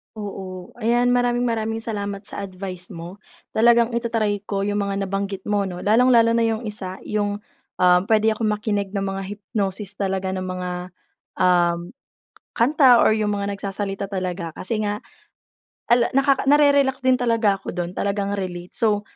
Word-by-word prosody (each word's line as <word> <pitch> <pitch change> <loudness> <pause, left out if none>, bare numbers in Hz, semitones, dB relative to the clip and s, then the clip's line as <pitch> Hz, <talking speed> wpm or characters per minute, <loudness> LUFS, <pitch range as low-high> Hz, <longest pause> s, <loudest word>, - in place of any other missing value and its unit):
Oo, 190 -3 -7
ayan 240 +1 +2
maraming-maraming 240 -2 +1
salamat 205 -3 -4
sa 200 - -5
advice 185 -1 -7
mo. 170 +1 -8 0.4
Talagang 235 +1 +4
i-ta-try 220 -4 -1
ko 200 -1 -3
yung 205 +1 0
mga 195 0 -2
nabanggit 195 0 -3
mo 205 -1 +1
'no, 180 -2 -5
lalong-lalo 230 +2 +4
na 230 - +3
yung 225 0 -1
isa 190 -3 -5
yung, 205 -1 -1 0.4
um, 180 0 +6
pwede 220 0 +4
akong 215 -1 0
makinig 205 -2 -2
ng 195 -1 -2
mga 195 0 -3
hypnosis 200 -1 -3
talaga 190 -1 -2
na 185 - -3
mga, 180 -1 -5 0.5
um, 175 +2 +2 0.6
kanta 255 -1 +5
or 220 - +4
yung 210 -1 0
mga 200 0 -2
nagsasalita 195 0 -4
talaga. 185 -4 -4
Kasi 215 +6 -3
nga 205 +1 -2 0.9
ala 240 0 +5
nakaka 275 0 +3
na-re-relax 280 -2 +4
din 260 0 +4
talaga 230 -5 +2
ako - - -6
doon 175 -1 -3
talagang 200 0 -1
relate. 180 -2 -5
So, 210 -2 +2
205 Hz, 155 wpm, -22 LUFS, 190-230 Hz, 0.9 s, um